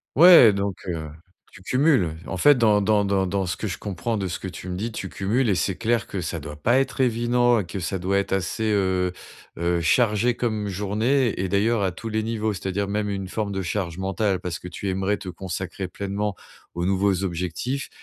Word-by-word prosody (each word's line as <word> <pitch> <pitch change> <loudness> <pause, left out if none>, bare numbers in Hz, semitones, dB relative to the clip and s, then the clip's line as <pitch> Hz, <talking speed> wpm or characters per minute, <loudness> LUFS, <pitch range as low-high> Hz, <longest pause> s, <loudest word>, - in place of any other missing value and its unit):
Ouais 165 -7 +9
donc, 100 -1 -2
heu, 80 -3 -4 0.4
tu - - -14
cumules. 125 - +2
En 95 - -4
fait, 145 +8 +6
dans 105 -3 +4
dans 105 0 +2
dans 100 -1 +1
dans 95 +1 -1
ce 85 -2 -2
que 110 - -4
je 90 - -4
comprends 100 +3 -3
de 95 -2 -2
ce 90 - -4
que - - -6
tu 90 - -8
me 90 - -3
dis, 110 +6 -3
tu 100 -3 -5
cumules 115 +9 0
et - - +4
c'est 95 +1 0
clair 115 +3 0
que 95 - -4
ça 85 0 -4
doit 75 0 -8
pas 120 - +2
être 135 0 -1
évident 120 0 +3
et 100 - -3
que 95 - -5
ça 95 +2 -3
doit 95 +2 0
être 100 - -1
assez, 95 +3 -1
heu 95 -3 +1 0.5
heu 85 0 +1
chargé 115 +5 +3
comme 110 -4 -2
journée 110 +6 0
et 95 0 -1
d'ailleurs 105 +2 +2
à 95 - +1
tous 115 +6 -7
les 110 0 -1
niveaux. 110 -1 -1
C'est-à-dire 95 +1 -2
même 105 +1 -1
une 95 -1 -4
forme 105 +1 -3
de 95 -1 -2
charge 90 -1 -3
mentale, 95 0 0
parce 90 -1 -4
que 90 - -9
tu 90 +3 -5
aimerais 95 +2 0
te 95 -2 -8
consacrer 95 +2 -5
pleinement 100 +2 -3 0.4
aux 85 0 -2
nouveaux 95 0 +1
objectifs, 90 - -3
100 Hz, 220 wpm, -24 LUFS, 90-110 Hz, 0.5 s, Ouais